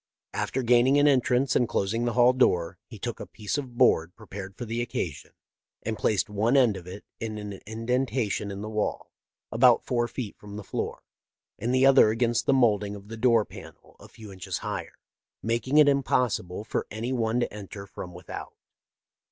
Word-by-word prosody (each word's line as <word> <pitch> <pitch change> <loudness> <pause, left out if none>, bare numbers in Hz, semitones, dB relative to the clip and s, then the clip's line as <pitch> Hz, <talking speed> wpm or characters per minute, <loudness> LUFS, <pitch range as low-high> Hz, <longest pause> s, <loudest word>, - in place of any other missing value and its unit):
After 130 - -2
gaining 125 +3 +4
an 145 +1 +5
entrance 130 -1 +2
and 120 - +2
closing 115 +5 0
the 120 - 0
hall 125 +1 +5
door, 90 -8 +1
he - - -10
took - - -5
a - - -7
piece 105 +1 -4
of 125 -4 -8
board 90 -9 +3
prepared 100 -3 -9
for 120 - -5
the 115 +1 -2
occasion, 85 -10 -4 0.5
and 110 0 -2
placed 105 -2 +1
one 110 +6 +2
end 120 -6 +4
of 90 -2 -9
it 95 +3 -9
in 110 -1 -4
an 100 -2 -7
indentation 115 -1 -1
in 100 0 -6
the - - -5
wall, 105 -1 -2 0.4
about 120 +1 +5
four 120 -1 0
feet 120 -4 -6
from 105 -1 -10
the 105 - -6
floor, - - -4 0.6
and 120 - -1
the 130 +1 +4
other 135 -5 +7
against 120 +2 0
the - - +5
molding 105 -6 +2
of 100 +1 -12
the 115 - -6
door 115 -2 +4
panel - - -13
a - - -13
few 110 -3 -12
inches 95 -2 -5
higher, - - -5 0.5
making 120 +5 0
it 150 -1 +8
impossible 125 -9 +1
for - - -3
any 115 +4 -3
one 115 -1 0
to 120 - -1
enter 100 -1 -8
fronS 90 -2 -9
without. 90 -1 -8
115 Hz, 190 wpm, -27 LUFS, 100-125 Hz, 0.6 s, it